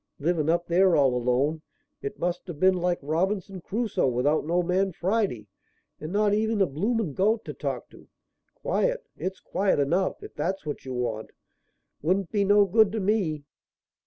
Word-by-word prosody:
Livin' 160 0 0
up 170 +1 +2
there 180 +1 +4
all 135 -3 +4
alone, 125 +6 +1 0.4
it 415 - -5
must 175 +1 -2
have 165 -5 -7
been 190 +2 +5
like 180 -1 0
Robinson 185 +5 -1
Crusoe 220 - -1
without 140 +5 +1
no 175 +2 +2
man 190 +2 +1
Friday 185 - -1 0.5
and 155 +2 -6
not 205 +1 +2
even 220 +1 +1
a 195 - +5
blooming 195 - -1
goat 215 - +1
to - - -5
talk - - -4
to. - - -16 0.5
Quiet! - - -1
It's 190 0 -4
quiet 195 -5 0
enough, 170 +7 0
if - - -10
that's 190 -1 -3
what 145 -2 -5
you 130 - -5
want. 115 -3 -3 0.7
Wouldn't 185 +4 0
be 205 -2 +2
no 205 +1 +5
good 210 +1 +4
to 225 - -1
me." 190 -7 0
180 Hz, 170 wpm, -26 LUFS, 155-205 Hz, 0.7 s, been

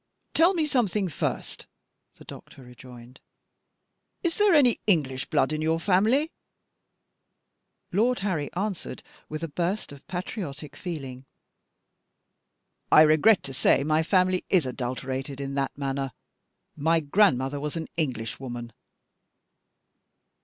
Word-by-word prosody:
"Tell 345 +4 +4
me 320 -3 +1
something 215 -9 0
first," 155 - -4 0.5
the - - -15
doctor 135 - -12
rejoined. 125 0 -14 1.0
"Is 340 -2 0
there 415 -4 +5
any 255 -6 +4
English 140 -9 +1
blood 135 - +2
in 155 - -2
your 160 +1 +1
family?" 220 - +2 1.6
Lord 230 +5 +2
Harry 175 -8 -2
answered 195 0 -4 0.3
with 155 +1 -5
a - - -1
burst 175 +6 -2
of 140 -1 -13
patriotic 170 - -6
feeling: 135 -7 -7 1.6
"I 155 - +9
regret 160 +7 +5
to 135 - -6
say 135 - +3
my 155 +2 +2
family 185 +1 +2
is 180 -7 +3
adulterated 130 +2 -4
in 140 0 -4
that 135 -1 -2
manner. 135 -2 -3 0.6
My 160 +2 +2
grandmother 145 -4 +2
was 150 +2 -4
an 165 -1 -4
Englishwoman." 120 -4 -4
155 Hz, 115 wpm, -26 LUFS, 135-195 Hz, 1.6 s, I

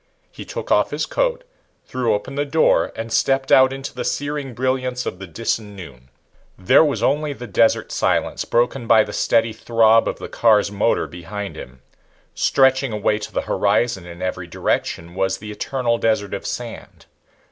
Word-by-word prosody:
He - - -10
took - - -6
off - - +3
his - - -2
coat, - - -1 0.4
threw 120 -4 0
open 105 +6 -6
the 145 +1 -1
door 155 +3 +2
and 115 0 -5
stepped 135 0 +1
out 130 0 +6
into 135 0 -6
the - - -4
searing 145 -3 -3
brilliance 130 0 -1
of 90 - -5
the 95 - -8
Disan 105 +3 -3
noon. 65 -9 -12 0.5
There 110 - +5
was 150 -3 -1
only 150 +1 +1
the 125 - -9
desert 115 +1 +2
silence, - - 0
broken 120 +1 0
by 110 -1 +6
the 105 - -8
steady 115 -1 +1
throb 115 0 +3
of - - -2
the - - -7
car's 105 -3 +3
motor 105 +3 +1
behind 95 +4 -7
him. 65 0 -11 0.5
Stretching 135 -1 +2
away 105 0 0
to 105 - -7
the - - -1
horizon 100 -2 0
in 85 +1 -9
every 90 -1 -3
direction 85 0 -2
was 95 +1 -1
the 105 0 -8
eternal 120 +1 -1
desert 110 -3 0
of - - -4
sand. - - -7
115 Hz, 175 wpm, -21 LUFS, 100-130 Hz, 0.5 s, out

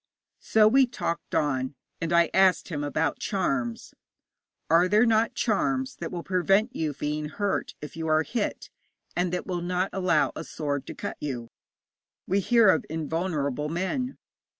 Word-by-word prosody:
So 215 -1 +4
we 265 +3 +5
talked 170 -8 -4
on, 130 -2 0 0.3
and 165 0 -2
I 170 -1 +4
asked 190 -1 +4
him 150 -4 -3
about 145 +1 -1
charms. 135 - -2 0.7
'Are 170 +3 +5
there 210 +5 +4
not 225 0 +2
charms 260 +4 0
that 165 - -5
will 175 -2 -5
prevent 195 +6 +2
you 155 -2 -1
being 150 +1 -3
hurt 200 +4 -2
if 150 - -8
you 165 0 -4
are 155 0 +3
hit, 225 +4 -3 0.4
and 175 0 0
that 180 - -2
will 180 -2 -3
not 180 +2 -1
allow 180 -5 +2
a - - -5
sword 145 -3 -3
to - - -7
cut - - -5
you? 125 -5 -4 0.8
We 195 +2 +1
hear 230 +1 +5
of 160 - +3
invulnerable 155 -2 -2
men. 190 - -2
170 Hz, 160 wpm, -27 LUFS, 150-195 Hz, 0.8 s, we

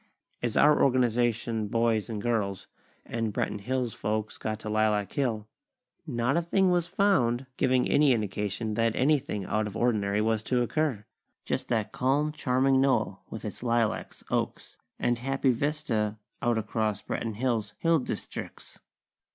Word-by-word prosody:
As 120 -2 -1
our 150 0 +5
Organization 120 -3 +1
boys 115 0 +1
and 110 -2 -3
girls, 105 -5 -1 0.4
and 115 -2 -2
Branton 105 0 -2
Hills 125 +1 -1
folks 110 0 -3
got 110 0 -3
to - - -7
Lilac 105 -1 +1
Hill, 115 -6 -1 0.6
not 120 0 0
a 170 - +3
thing 185 +2 +2
was 175 -1 +1
found 135 -11 +2
giving 130 -1 +2
any 145 -1 +4
indication 105 -1 -1
that 115 0 +1
anything 135 -8 +1
out 110 +2 0
of 105 - -6
ordinary 105 -4 +1
was 110 0 +1
to 125 +2 +1
occur! 125 -5 -1 0.4
Just - - -2
that 110 -3 0
calm, 145 +4 +1
charming 135 -2 +2
knoll, 135 0 +1
with - - -7
its - - -6
lilacs, 115 -2 -1
oaks, - - -2 0.2
and 120 -1 0
happy 135 +1 +1
vista 115 -6 -1 0.2
out 120 -1 +2
across 110 -1 -1
Branton 115 -2 -3
Hills' 115 -3 -1
hill 165 -1 +3
districts! 125 - -6
120 Hz, 150 wpm, -28 LUFS, 110-130 Hz, 0.6 s, our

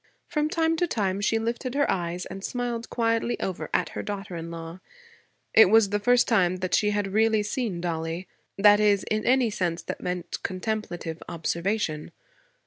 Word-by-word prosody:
From 305 -3 -1
time 325 0 +1
to 350 - +1
time 200 - -1
she 225 +2 +2
lifted 235 +3 -3
her 285 0 +2
eyes 175 0 -2
and 195 +1 -8
smiled 240 -1 -3
quietly 230 0 0
over 190 -2 -4
at - - +1
her - - -5
daughter 200 -3 -5
in 165 0 -6
law. 165 +1 -7 0.7
It 220 - +8
was 220 -1 +5
the 205 - +1
first 245 +3 +3
time 185 -6 +3
that 185 0 -4
she 210 - +3
had 205 -2 -1
really 220 0 +3
seen 210 -4 -2
Dollie, 165 +1 -3 0.3
that 205 +1 +6
is, 205 -2 +3
in 215 0 0
any 250 -2 +3
sense 175 -4 -2
that - - -6
meant 180 -1 -4
contemplative 185 -4 -4
observation. 170 -1 -2
205 Hz, 175 wpm, -26 LUFS, 180-230 Hz, 0.7 s, It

